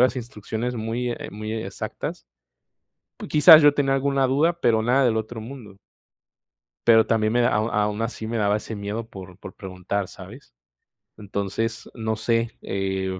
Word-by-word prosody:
las 130 +1 +3
instrucciones 120 0 -4
muy, 115 +2 -3
eh, - - -7
muy 110 +1 -6
exactas. 110 - -5 1.0
Quizás, 155 +1 +9
yo 145 -1 +6
tenía 135 -2 +1
alguna 135 0 +1
duda, 160 +6 +1
pero 110 -5 +3
nada 130 +4 +3
del 115 -2 +2
otro 110 +1 -5
mundo. 110 -5 -10 1.1
Pero 110 -1 +6
también 110 -1 +1
me 120 - +3
da 120 - +3
au 105 +1 +1
aún 105 +1 0
así, 115 -1 -5
me 115 +1 -2
daba 105 0 +2
ese 110 +1 -7
miedo 105 +3 -5
por 95 -1 -11
por 95 - -10
preguntar, 95 +1 -4
¿sabes? - - -13 0.6
Entonces, 105 +2 -4
no 110 -2 -2
sé, 115 +1 0
eh, 95 -1 -3
110 Hz, 160 wpm, -24 LUFS, 105-125 Hz, 1.1 s, Quizás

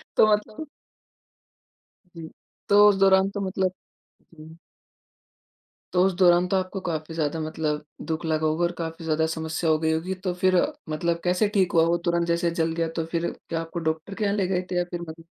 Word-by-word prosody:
तो - - +6
मतलब 215 +8 -1 1.5
जी। 160 -1 -8 0.4
तो 205 +1 +7
उस 200 - +3
दौरान 195 0 +5
तो 205 - -5
मतलब 190 -1 -1 0.6
जी। 160 +1 -13 1.4
तो 180 - +4
उस 190 - +1
दौरान 175 -1 +5
तो 195 - +1
आपको 185 +1 -2
काफ़ी 160 -3 -4
ज़्यादा 160 0 -1
मतलब 155 -1 -2 0.2
दुःख 160 +1 -3
लगा 155 0 0
होगा 155 +3 0
और 175 - 0
काफ़ी 165 0 -5
ज़्यादा 160 0 +1
समस्या 160 0 -2
हो 155 - +3
गई 160 0 0
होगी। 170 +4 -2
तो 180 - 0
फ़िर 185 0 +2 0.3
मतलब 170 +2 -1
कैसे 180 +4 +2
ठीक 185 -3 +2
हुआ 165 -1 +5
वो 170 +1 +2
तुरँत? 170 0 +1
जैसे 170 0 +1
जल 165 -1 -1
गया 165 0 -1
तो 165 - -1
फ़िर 170 +1 -2 0.2
क्या 165 -1 -2
आपको 165 +1 -6
डॉक्टर 160 +5 -6
के 215 +1 -2
यहाँ 200 0 +1
ले 195 -3 +1
गए 180 -1 0
थे 180 - -2
या 175 - +2
फ़िर 175 - -4
मत 165 +1 -10
170 Hz, 200 wpm, -25 LUFS, 160-185 Hz, 1.5 s, तो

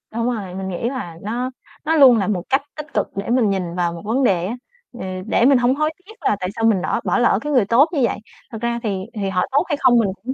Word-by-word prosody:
Đúng 230 0 -1
rồi, 195 -6 -5
mình 190 0 -4
nghĩ 190 +6 -2
là 175 -12 -6
nó 240 +5 -3 0.4
nó 320 +1 +2
luôn 260 -6 +7
là 195 - 0
một 185 -5 -1
cách 270 +1 +3 0.2
tích 300 +1 -8
cực - - 0
để 200 +2 -4
mình 240 -4 +3
nhìn 180 -3 -2
vào 175 -1 0
một 170 - -8
vấn 240 +6 +1
đề 180 -7 +2
á. 225 - -3 0.4
Ừ, 245 - -13 0.3
để 235 - +2
mình 275 -1 +6
hông 245 +2 +2
hối 305 +2 0
tiếc 440 - -13
là 210 - +2
tại 185 -1 -3
sao 225 - 0
mình 210 -5 +3
nỏ - - -1
bỏ - - +1
lỡ 235 -4 +3
cái 295 - -3
người 245 -6 +4
tốt 255 - +4
như 290 - +1
vậy. 230 - +1 0.3
Thật 225 - -6
ra 235 0 -1
thì 195 -4 -2
thì 200 -3 -2
họ 180 -1 +1
tốt 285 +5 +3
hay 290 - 0
không 250 -2 +5
mình 210 - +1
cũng 255 +2 -3
230 Hz, 285 wpm, -20 LUFS, 195-260 Hz, 0.4 s, luôn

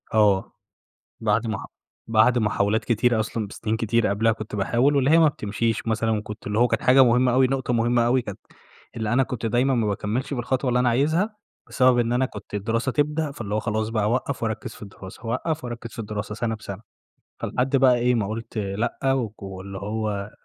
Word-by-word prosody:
آه، 105 -3 +3 0.7
بعد 110 +1 +1
مح 110 -2 -3 0.4
بعد 115 +3 +4
محاولات 105 -1 +1
كتيرة 120 0 +2
أصلًا، 110 0 -2
بسنين 110 +2 -3
كتير 115 0 +1
قبلها 110 +3 +2
كنت 110 -1 -6
باحاول، 120 +8 +2
واللي 135 -1 +3
هي 160 - +6
ما 160 - +6
بتمشيش 115 -4 -2
مثلًا 115 0 0
وكنت 105 -1 -4
اللي 105 +1 0
هو 120 - +5
كانت - - -1
حاجة 130 +1 +6
مهمة 125 +1 +3
أوي، 130 +1 +4
نقطة 130 -1 -1
مهمة 120 +1 +2
أوي 125 +2 +3
كانت 100 -5 -8 0.6
اللي 110 -1 -1
أنا 135 +2 +4
كنت 120 -2 -5
دايمًا 125 +4 +2
ما 115 -3 +1
باكمّلش 105 +7 -2
بالخطوة 130 +1 -1
اللي 125 0 +2
أنا 125 0 +3
عايزها، 160 - +1 0.3
بسبب 130 -2 +3
إن 120 0 +1
أنا 130 +2 +2
كنت 105 -5 -10
الدراسة 115 +5 -1
تبدأ 150 +2 0
فاللي 105 -6 -4
هو - - +1
خلاص 110 0 -2
بقى 110 -2 0
أوقّف 125 +4 -1
واركّز 110 -1 -3
في - - -16
الدراسة، 100 0 -11
اوقّف 150 +7 -2
واركّز 120 -1 -6
في - - -9
الدراسة 105 -1 -4
سنة 115 0 -2
بسنة. 100 -2 -8 0.6
فلحد 130 +2 0
بقى 130 -2 +5
إيه، 125 +1 +2
ما 110 -4 0
قُلت 115 +1 -5
لأ، 110 +6 -1
وك 115 -6 -3
واللي 95 0 -7
هو 105 0 -3
115 Hz, 195 wpm, -24 LUFS, 105-125 Hz, 0.7 s, هي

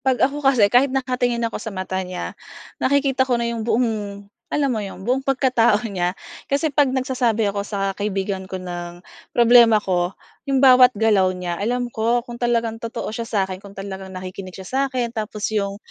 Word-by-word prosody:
'pag 260 -1 +1
ako 285 +2 -1
kasi 270 -6 +4
kahit 255 +3 +5
nakatingin 250 -3 -1
ako - - -6
sa 225 - -5
mata 185 0 -4
niya 180 0 -5 0.5
nakikita 270 -1 +2
ko 245 - +3
na - - 0
'yong 230 -1 -3
buong 235 +1 +2 0.6
alam 285 -2 +1
mo 220 - -1
'yon 195 -2 -7
buong 255 +2 +1
pagkatao 245 -5 +3
niya. 180 -3 -1 0.4
Kasi 285 +2 0
'pag 285 0 +3
nagsasabi 255 -4 0
ako 200 0 -3
sa 195 -2 -1
kaibigan 195 -2 -3
ko 190 - -4
ng 175 -1 -7 0.4
problema 235 -1 +7
ko 180 -1 0 0.4
'yong 270 -1 +2
bawat 255 -1 +8
galaw 205 -3 +3
niya 175 -1 -3
alam 245 +3 -1
ko 235 +2 +1
kung 240 0 -8
talagang 235 -2 0
totoo 230 0 -5
siya 230 +1 -4
sa'kin, 190 -4 -1
kung 200 0 -13
talagang 195 -1 -7
nakikinig 185 0 -8
siya 190 -1 -9
sa 265 +1 0
'kin, 245 -3 -2
tapos 215 -2 -3
'yong 200 -2 -1
230 Hz, 185 wpm, -21 LUFS, 195-255 Hz, 0.6 s, bawat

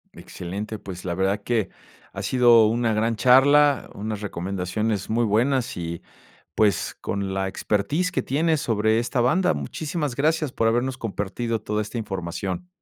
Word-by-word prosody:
Excelente, 100 +5 -6
pues, 95 -3 -9
la 85 -1 -2
verdad 95 +2 0
que 115 -3 0 0.4
ha - - -6
sido 120 -3 +5
una 115 0 +1
gran 115 +2 +1
charla, 140 +4 +5
unas 105 0 -4
recomendaciones 95 +2 -3
muy 115 +2 +2
buenas 120 +4 +1
y 85 -1 -5 0.5
pues, 105 -2 +1
con 100 -1 -3
la 95 0 -1
expertise 105 - -1
que - - -1
tienes 155 +2 +1
sobre 110 -1 +2
esta 120 +2 -1
banda. 155 +10 +3
Muchísimas 145 - -4
gracias 155 0 +1
por 115 - 0
habernos 120 +3 +1
compartido 115 +1 -3
toda 105 0 -2
esta 105 +3 -6
información. 95 - -4
110 Hz, 150 wpm, -24 LUFS, 100-130 Hz, 0.5 s, sido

